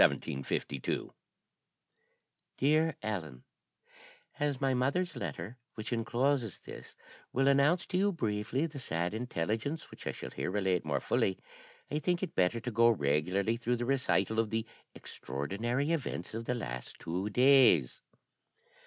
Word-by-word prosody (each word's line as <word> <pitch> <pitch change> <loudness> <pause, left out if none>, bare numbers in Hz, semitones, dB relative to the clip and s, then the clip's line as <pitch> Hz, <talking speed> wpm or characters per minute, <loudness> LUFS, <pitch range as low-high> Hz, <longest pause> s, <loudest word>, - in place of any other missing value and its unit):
_ 70 0 0 1.4
"DEAR 155 +3 +3
ELLEN, 80 -12 -4 1.0
"As 145 -2 0
my 135 -1 +2
mother's 140 +8 0
letter, 85 - -5 0.2
which 110 +3 -4
encloses 120 0 0
this, - - -10 0.4
will 135 +2 +2
announce 140 +6 +4
to 180 - -1
you 200 +1 +3
briefly 115 - -1
the 155 -3 -6
sad 85 -5 -1
intelligence 115 - -2
which - - -9
I - - +1
shall - - -7
here - - -3
relate 95 -2 +1
more - - -1
fully, 95 - +1 0.5
I 150 - 0
think 175 +4 0
it 185 - -3
better 90 +5 +2
to 125 - -3
go 115 +1 +5
regularly 90 +5 +1
through 120 +1 0
the 120 0 -2
recital 130 -4 +1
of 115 -1 +1
the 110 0 -1 0.3
extraordinary 115 - -2
events 135 - -2
of 115 +1 -4
the 125 - 0
last 60 - -5
two 90 +5 -3
days. 135 - +5
115 Hz, 140 wpm, -32 LUFS, 95-140 Hz, 1.4 s, go